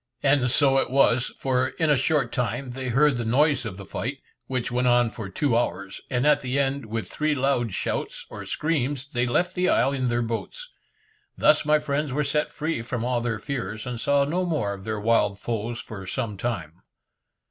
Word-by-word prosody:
And 135 -3 +3
so 135 +1 +4
it - - 0
was, 130 -2 +3
for 130 -1 +1
in 160 +1 0
a - - +6
short 135 -2 +1
time 125 +2 -2
they 130 +1 -5
heard 135 +2 +3
the 120 - -2
noise 135 +3 +2
of 100 -4 -5
the 100 - -8
fight, 130 +8 -4 0.3
which 125 -1 -2
went 125 +1 +1
on 120 -2 +4
for 110 -5 -7
two 120 +5 0
hours, 100 -4 -2
and 125 0 0
at 150 0 +4
the 130 +1 -2
end, 140 -3 0
with 110 +1 -3
three 155 0 0
loud 130 -6 0
shouts - - -3
or - - -7
screams, 145 -3 -1
they 120 0 +1
left 175 +9 +1
the 180 0 +1
isle 135 - +3
in 130 -2 -1
their 120 0 +1
boats. 485 - -4 0.7
Thus 150 0 +4
my 150 0 +5
friends 150 -1 -2
were 150 +3 0
set 150 +1 0
free 155 -5 -2
from 120 0 -3
all 125 -1 0
their 115 -2 -1
fears, 110 -2 -4
and 125 -2 -4
saw 140 +3 +3
no 175 +6 0
more 150 - -1
of 100 0 -10
their 110 -1 -2
wild 105 -2 +2
foes 115 +2 -3
for 95 -4 -8
some 115 0 -3
time. 90 -7 -4
125 Hz, 205 wpm, -25 LUFS, 115-145 Hz, 0.7 s, a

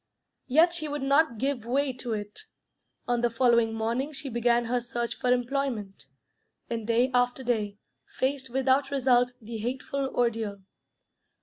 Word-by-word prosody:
Yet 320 +6 +5
she 310 -3 -2
would 290 -1 -3
not 275 -2 +3
give 270 0 -1
way 265 +3 0
to 245 -2 -4
it. 210 -1 -5 0.7
On 240 -1 +1
the 240 - +2
following 235 -1 +3
morning 235 +7 -1
she 275 0 -5
began 235 0 +2
her 245 +1 0
search 240 0 -3
for 250 - +1
employment, 245 - -1 0.6
and 225 -2 -3
day 240 +3 +2
after 245 +1 +1
day 215 -5 -1 0.4
faced 260 0 -1
without 265 +2 +2
result 250 -2 +3
the 225 0 -7
hateful 265 +4 -2
ordeal. 225 -5 -1
245 Hz, 145 wpm, -28 LUFS, 230-270 Hz, 0.7 s, Yet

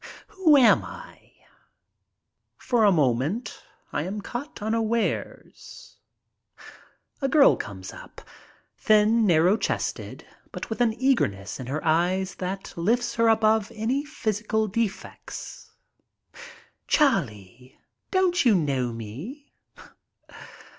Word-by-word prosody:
Who 330 -6 +4
am 250 -4 +5
I? - - -12 1.3
For 235 -4 +1
a 205 - +6
moment 155 - 0 0.3
I - - -1
am 190 +6 -4
caught 245 +8 -7
unawares. 225 +1 -3 1.2
A 275 - +1
girl 280 0 +6
comes 95 -2 -8
up - - -12 0.3
— - - -36
thin, 215 +1 +3
narrow 175 +4 +4
chested, - - -4 0.3
but - - -7
with 220 - -3
an 225 -2 +2
eager 265 -1 +3
ness 100 +3 -9
in 130 - -7
her 150 +5 -4
eyes 180 +4 +1
that 190 +1 -5
lifts 235 +7 0
her 230 0 +2
above 220 -1 +2
any 240 +6 -1
physical 220 -6 -2
defects. 210 0 -5 1.2
"Charlie, 125 - 0 0.3
don't 375 -1 +2
you 235 -5 +4
know 135 -7 0
me?" 140 - -9
215 Hz, 110 wpm, -25 LUFS, 155-240 Hz, 1.3 s, a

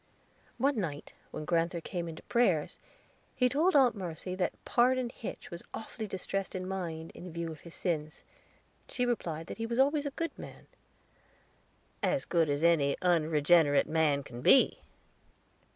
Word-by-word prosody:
One 265 0 +1
night 150 -7 -4 0.2
when 155 - -6
grand'ther 170 +1 +1
came 170 0 -4
in 160 - -7
to - - -12
prayers, 190 -11 +1 0.6
he 250 - +3
told 310 +8 +2
Aunt 260 -4 +6
Mercy 180 -2 -5
that 185 0 -1
Pardon 250 0 +2
Hitch 235 - -8
was 170 0 -6
awfully 220 0 -6
distressed 195 0 -3
in 185 0 -4
mind, 170 -4 -4
in 180 0 -9
view 170 0 -4
of 155 - -10
his 170 - -12
sins. 155 -4 -3 0.7
She 250 - 0
replied 165 -10 -2
that - - -8
he 225 - -2
was 235 0 -2
always 285 +2 +3
a 275 - -8
good 330 0 -2
man. - - -10 1.4
"As 285 - 0
good 165 -3 +2
as 145 +2 0
any 155 -5 +3
unregenerate 160 -3 +4
man 155 -3 +2
can 120 -3 -9
be." 265 - +5
175 Hz, 160 wpm, -31 LUFS, 160-235 Hz, 1.4 s, Aunt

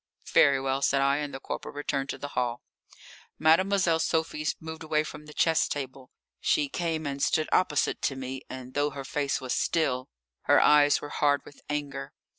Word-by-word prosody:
"Very 140 -1 +6
well," 135 0 -1
said 140 0 +2
I, 140 +1 +3
and 145 -1 -3
the 135 - -6
corporal - - -6
returned 140 -1 -2
to - - -3
the 145 - -6
hall. 120 -3 -2 0.7
Mademoiselle 170 +1 +3
Sophie 160 -2 -1
moved 160 0 -8
away 155 -1 +1
from 150 0 -9
the - - -10
chess 165 +1 +2
table. 135 -2 -6 0.3
She 145 -2 +1
came 165 -1 -2
and 140 -1 -3
stood 155 +2 +2
opposite 160 -5 +1
to 135 - 0
me, 130 0 -5
and 130 0 -8
though 145 0 +1
her 140 -1 -7
face 140 0 -1
was 130 -2 -3
still, 130 -6 0 0.4
her - - +6
eyes 145 -1 +5
were 145 - -7
hard 145 -1 +1
with 145 - -15
anger. 140 -1 -4
145 Hz, 185 wpm, -28 LUFS, 135-155 Hz, 0.7 s, Very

